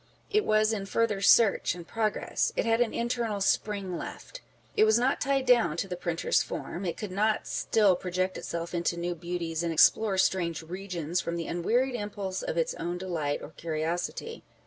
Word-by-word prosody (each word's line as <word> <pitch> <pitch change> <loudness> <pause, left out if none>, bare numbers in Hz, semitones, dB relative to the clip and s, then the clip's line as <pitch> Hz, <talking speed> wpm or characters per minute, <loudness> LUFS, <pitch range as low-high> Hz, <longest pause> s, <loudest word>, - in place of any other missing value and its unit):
It 425 0 +2
was 215 +1 +3
in 200 -2 -3
further 215 -2 0
search 200 -3 +5
and 170 -1 -10
progress. 220 -2 -1
It - - 0
had 225 +1 +2
an 240 - +2
internal 235 -3 -1
spring 195 -2 0
left. - - -8 0.3
It - - +5
was 220 +1 +5
not 255 +3 +1
tied 275 -1 +1
down 230 -12 +4
to 195 - -2
the 180 - -4
printer's 170 -1 0
form. 185 +3 -5
It 170 - -3
could 210 -4 -5 0.3
still 205 -4 +2
project 185 +1 -2
itself 170 +1 -5
into 170 0 0
new 175 +1 -2
beauties, 170 -1 -3
and 170 -1 -1
explore 195 +5 +4
strange 170 -4 +1
regions 180 -1 -3
from 170 - -3
the 170 -1 -3
unwearied 240 +10 0
impulse 205 -4 -4
of - - -3
its 165 - +1
own 175 +1 -3
delight 165 -6 -2
or - - -9
curiosity. 165 - -3
185 Hz, 180 wpm, -28 LUFS, 170-220 Hz, 0.3 s, search